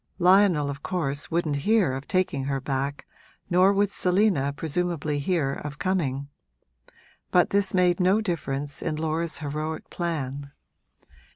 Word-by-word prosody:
Lionel, 180 Hz, -5 st, +4 dB
of 140 Hz, 0 st, -8 dB
course, 145 Hz, -6 st, -3 dB
wouldn't 160 Hz, -3 st, 0 dB
hear 195 Hz, -2 st, +2 dB
of 135 Hz, +2 st, -6 dB
taking 180 Hz, -8 st, 0 dB
her 135 Hz, 0 st, -1 dB
back, 135 Hz, +1 st, -3 dB, 0.5 s
nor 185 Hz, +2 st, +5 dB
would 200 Hz, 0 st, +1 dB
Selina 180 Hz, -8 st, +2 dB
presumably 155 Hz, 0 st, -2 dB
hear 145 Hz, -3 st, 0 dB
of 150 Hz, +1 st, -7 dB
coming; 145 Hz, -8 st, -1 dB, 1.0 s
but 180 Hz, -, +3 dB
this 200 Hz, -1 st, +1 dB
made 180 Hz, -1 st, +3 dB
no 190 Hz, +3 st, +4 dB
difference 145 Hz, -8 st, -3 dB
in 155 Hz, -, -2 dB
Laura's 160 Hz, +1 st, -1 dB
heroic 155 Hz, +1 st, -4 dB
plan. 140 Hz, -5 st, -4 dB
160 Hz, 130 wpm, -26 LUFS, 140-180 Hz, 1.0 s, nor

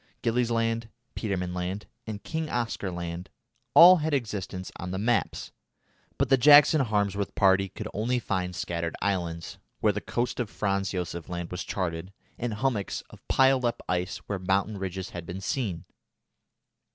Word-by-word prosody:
Gillies 120 Hz, +1 st, +1 dB
Land, 115 Hz, -1 st, 0 dB, 0.3 s
Petermann 90 Hz, -5 st, -2 dB
Land, 90 Hz, +3 st, -3 dB, 0.2 s
and 105 Hz, -2 st, -5 dB
King 160 Hz, -1 st, -3 dB
Oscar 115 Hz, -6 st, -2 dB
Land 85 Hz, 0 st, -5 dB, 0.5 s
all 180 Hz, +2 st, +10 dB
had 155 Hz, -2 st, 0 dB
existence 100 Hz, -7 st, -4 dB
on 90 Hz, -, -5 dB
the 95 Hz, -, -3 dB
maps; 115 Hz, +4 st, 0 dB, 0.7 s
but -, -, +2 dB
the 135 Hz, -, +6 dB
Jackson 145 Hz, +3 st, +7 dB
Harmsworth 100 Hz, -4 st, 0 dB
party 95 Hz, 0 st, +4 dB
could 105 Hz, -, -6 dB
only 115 Hz, +5 st, 0 dB
find 90 Hz, -6 st, -2 dB
scattered 85 Hz, -1 st, -3 dB
islands 85 Hz, -4 st, -2 dB, 0.2 s
where 105 Hz, -1 st, +3 dB
the 105 Hz, -, -3 dB
coast 120 Hz, +1 st, -2 dB
of 120 Hz, -4 st, -1 dB
Franz 100 Hz, -2 st, -1 dB
Josef 85 Hz, -2 st, -4 dB
Land 85 Hz, -1 st, -4 dB
was 90 Hz, 0 st, -3 dB
charted, 90 Hz, -1 st, -3 dB, 0.3 s
and 120 Hz, -3 st, -2 dB
hummocks 110 Hz, -3 st, -1 dB
of -, -, -14 dB
piled 130 Hz, -1 st, +4 dB
up 120 Hz, -1 st, -1 dB
ice 90 Hz, 0 st, -1 dB
where 100 Hz, -2 st, -3 dB
mountain 95 Hz, +3 st, 0 dB
ridges 95 Hz, 0 st, -4 dB
had 85 Hz, -, -6 dB
been 90 Hz, +2 st, -5 dB
seen. 95 Hz, -, -2 dB
100 Hz, 160 wpm, -27 LUFS, 90-115 Hz, 0.7 s, all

